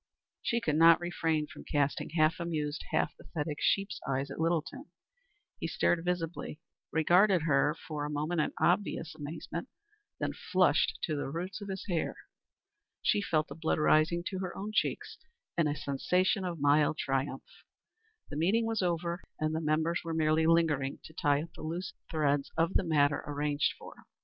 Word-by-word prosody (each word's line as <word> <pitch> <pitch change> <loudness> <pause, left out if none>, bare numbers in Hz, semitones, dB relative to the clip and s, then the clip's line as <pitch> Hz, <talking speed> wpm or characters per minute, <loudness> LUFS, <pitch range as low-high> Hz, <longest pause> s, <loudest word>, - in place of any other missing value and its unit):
She 235 - 0
could 155 -9 0
not 165 +1 +7
refrain 165 -3 0
from - - -12
casting 145 -1 0
half 155 +3 +3
amused, 155 -3 -3
half - - 0
pathetic 150 -2 -5
sheep's 195 0 +1
eyes 135 +1 -1
at 135 - -7
Littleton. 170 - -1 0.7
He - - -2
started 170 0 +1
visibly, 165 -4 -3 0.3
regarded 175 +2 +4
her 150 -1 +3
for, 150 -2 -3
a 145 - -3
moment 155 +3 0
in - - -1
obvious 175 -2 +1
amazement, 160 - -6 0.5
then - - -1
flushed - - +2
to 155 - 0
the 145 - -3
roots 180 +8 -5
of 200 - -6
his 190 -1 -5
hair. 170 -4 -1 0.9
She 205 - +3
felt 155 -6 +1
the - - -8
blood 160 -1 -1
rising 155 +2 +3
to 190 - -4
her 185 -2 -4
own 205 +2 -4
cheeks, - - -1 0.4
and 165 -3 +2
a 145 - -1
sensation 180 +8 +1
of 175 -3 -4
mild 145 +2 +3
triumph. 135 0 -2 0.9
The 145 - -4
meeting 200 +9 +2
was 225 -2 0
over 170 0 -1 0.2
and 155 0 0
the 160 - -1
members 160 +2 +1
were 165 -1 -3
merely 160 0 +3
lingering 155 -5 +2
to 160 - -12
tie 145 -1 +2
up 165 - -11
the - - -11
loose 170 +4 -4 0.2
threads 145 -3 +1
of 165 +3 +2
the - - +3
matter 145 -3 +2
arranged 145 0 0
for. - - -11
160 Hz, 170 wpm, -31 LUFS, 150-175 Hz, 0.9 s, not